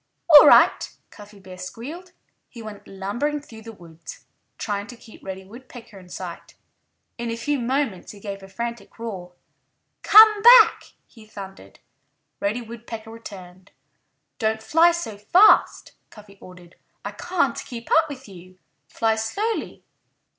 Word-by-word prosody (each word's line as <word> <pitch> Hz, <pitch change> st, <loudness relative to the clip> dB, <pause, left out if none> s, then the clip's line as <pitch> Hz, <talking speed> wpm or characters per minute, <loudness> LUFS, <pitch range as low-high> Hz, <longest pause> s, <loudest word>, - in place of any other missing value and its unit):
"All 295 Hz, -, +10 dB
right!" -, -, +4 dB
Cuffy 205 Hz, -1 st, -15 dB
Bear 185 Hz, -1 st, -13 dB
squealed. 295 Hz, -, -9 dB, 0.4 s
He 230 Hz, -2 st, -12 dB
went 210 Hz, -2 st, -11 dB
lumbering 205 Hz, +10 st, -4 dB
through 225 Hz, -6 st, -14 dB
the 225 Hz, +1 st, -10 dB
woods, 165 Hz, -5 st, -14 dB, 0.3 s
trying 205 Hz, -1 st, -4 dB
to 245 Hz, -, -12 dB
keep 230 Hz, -1 st, -17 dB
Reddy 190 Hz, 0 st, -8 dB
Woodpecker 230 Hz, -1 st, -14 dB
in 180 Hz, -1 st, -17 dB
sight. -, -, -9 dB, 0.6 s
In 235 Hz, 0 st, -4 dB
a 230 Hz, -, -3 dB
few 290 Hz, +4 st, -2 dB
moments 245 Hz, -5 st, -3 dB
he 205 Hz, -, -14 dB
gave 200 Hz, -1 st, -8 dB
a 195 Hz, -, -12 dB
frantic 235 Hz, +1 st, -7 dB
roar. 190 Hz, -6 st, -8 dB, 0.7 s
"Come 430 Hz, 0 st, +7 dB
back!" 485 Hz, +3 st, +6 dB
he 220 Hz, -2 st, -18 dB
thundered. 195 Hz, -, -12 dB, 0.6 s
Reddy 210 Hz, +5 st, -2 dB
Woodpecker 225 Hz, -1 st, -10 dB
returned. 190 Hz, -4 st, -13 dB, 0.7 s
"Don't 220 Hz, 0 st, -2 dB
fly 330 Hz, +7 st, +4 dB
so 230 Hz, -12 st, -6 dB
fast," 365 Hz, -, +3 dB, 0.2 s
Cuffy 205 Hz, -2 st, -17 dB
ordered. 180 Hz, -1 st, -16 dB, 0.3 s
"I -, -, -4 dB
can't 335 Hz, -9 st, -2 dB
keep 235 Hz, -2 st, -10 dB
up 320 Hz, 0 st, +3 dB
with 270 Hz, -3 st, -10 dB
you. 185 Hz, -1 st, -15 dB, 0.3 s
Fly 225 Hz, -1 st, 0 dB
slowly!" 395 Hz, -, -4 dB
220 Hz, 140 wpm, -22 LUFS, 195-255 Hz, 0.7 s, All